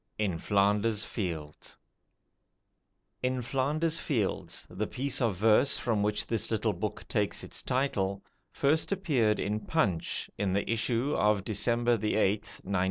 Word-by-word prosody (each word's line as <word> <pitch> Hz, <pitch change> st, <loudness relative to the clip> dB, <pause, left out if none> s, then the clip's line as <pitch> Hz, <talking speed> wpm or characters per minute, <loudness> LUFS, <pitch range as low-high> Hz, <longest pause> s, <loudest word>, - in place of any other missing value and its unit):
In 95 Hz, -6 st, -1 dB
Flanders 105 Hz, +2 st, +2 dB
Fields 80 Hz, -10 st, -5 dB, 1.4 s
"In 125 Hz, 0 st, -1 dB
Flanders 150 Hz, +6 st, 0 dB
Fields", 115 Hz, -, -2 dB
the 105 Hz, +2 st, -3 dB
piece 135 Hz, +1 st, -2 dB
of 115 Hz, -5 st, +2 dB
verse 110 Hz, +8 st, +4 dB
from 110 Hz, -4 st, 0 dB
which 105 Hz, 0 st, 0 dB
this 115 Hz, -2 st, -1 dB
little 110 Hz, -1 st, 0 dB
book 100 Hz, +4 st, -5 dB
takes 105 Hz, -3 st, -1 dB
its -, -, -4 dB
title, 100 Hz, -7 st, -1 dB, 0.3 s
first 155 Hz, +6 st, +1 dB
appeared 140 Hz, -, +2 dB
in 105 Hz, +2 st, -1 dB
'Punch' 100 Hz, -, 0 dB
in 100 Hz, -2 st, 0 dB
the 100 Hz, +1 st, 0 dB
issue 115 Hz, +4 st, 0 dB
of 105 Hz, -2 st, +2 dB
December 120 Hz, +3 st, +1 dB
8th, 105 Hz, -1 st, 0 dB
1915. 100 Hz, +1 st, -2 dB
110 Hz, 135 wpm, -30 LUFS, 100-125 Hz, 1.4 s, verse